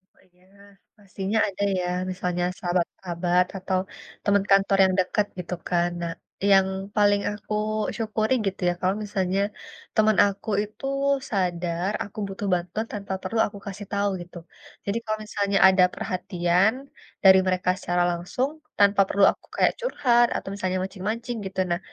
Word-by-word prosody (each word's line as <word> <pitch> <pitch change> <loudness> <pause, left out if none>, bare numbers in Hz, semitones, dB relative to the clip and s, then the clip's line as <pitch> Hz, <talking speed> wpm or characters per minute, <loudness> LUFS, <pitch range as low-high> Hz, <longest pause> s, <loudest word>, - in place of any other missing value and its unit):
Oh, - - -27
iya, 180 +1 -29 0.5
pastinya 200 +1 -3
ada 200 +1 -4 0.2
ya, 180 - -2 0.3
misalnya 180 -1 -2 0.2
sahabat-sahabat 175 0 0
atau 185 0 -1 0.4
teman 200 -1 +3
kantor 195 0 +4
yang 190 0 +3
dekat 195 +3 +1
gitu 180 0 -5
kan. 175 0 +1
Nah, 170 -1 -3 0.4
yang 195 -1 +6 0.3
paling 205 -1 +4
aku 210 +1 -6 0.4
syukuri 220 +1 0
gitu 195 0 -3
ya, - - +1
kalau 185 +1 +1
misalnya 195 -2 -1 0.6
teman 215 -1 +4
aku 200 +2 -4
itu 210 +5 -10 0.5
sadar, 175 -2 -1
aku 205 - -13
butuh 195 +1 -5
bantuan 180 +5 -2
tanpa 200 -2 -4
perlu 220 +4 -2
aku 205 - -10
kasih 200 +1 -7
tahu 200 0 +1
gitu. 175 0 -11 0.5
Jadi 200 +2 -1
kalau 215 -1 -2
misalnya 200 -1 0
ada 190 -1 +5
perhatian 180 +2 +1 0.5
dari 190 -1 +8
mereka 185 0 +1
secara 175 -1 0
langsung, 180 +10 -2 0.3
tanpa 200 0 +5
perlu 200 0 +4
aku - - -17
kayak - - +4
curhat, 255 - +3
atau - - -6
misalnya 185 -2 -2
mancing-mancing 220 +6 -4
gitu. 190 0 -5
Nah, 170 - +1
195 Hz, 150 wpm, -25 LUFS, 180-205 Hz, 0.6 s, dari